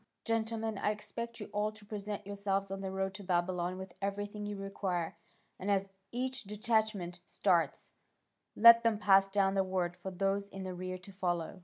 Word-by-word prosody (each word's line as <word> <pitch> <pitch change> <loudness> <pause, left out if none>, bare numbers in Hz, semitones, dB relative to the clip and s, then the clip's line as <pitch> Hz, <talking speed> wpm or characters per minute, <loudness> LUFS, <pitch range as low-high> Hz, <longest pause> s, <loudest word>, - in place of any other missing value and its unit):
Gentlemen, 225 -2 -1
I - - +1
expect 235 +2 -5
you - - -5
all 210 +1 +1
to 215 -1 -16
present 205 -1 -5
yourselves 195 -1 -1
on 195 0 -3
the 190 - -3
road 190 0 -1
to 200 +1 -8
Babylon 180 0 0
with 190 -1 -8
everything 205 +1 -3
you 205 - -3
require, 195 -4 -2 0.4
and 195 - -3
as 195 -1 +2 0.2
each 255 +1 -2
detachment 210 -4 0
starts, 170 -7 +1 0.6
let 230 +1 +10
them 230 -2 +2
pass 195 -1 +5
down 195 -1 +3
the 195 -1 +3
word 185 -2 -1
for 180 +1 -6
those 195 +2 0
in 195 -1 -7
the 185 -1 -4
rear 185 +1 -4
to 185 +2 -12
follow." 175 -1 -2
195 Hz, 180 wpm, -33 LUFS, 185-210 Hz, 0.6 s, let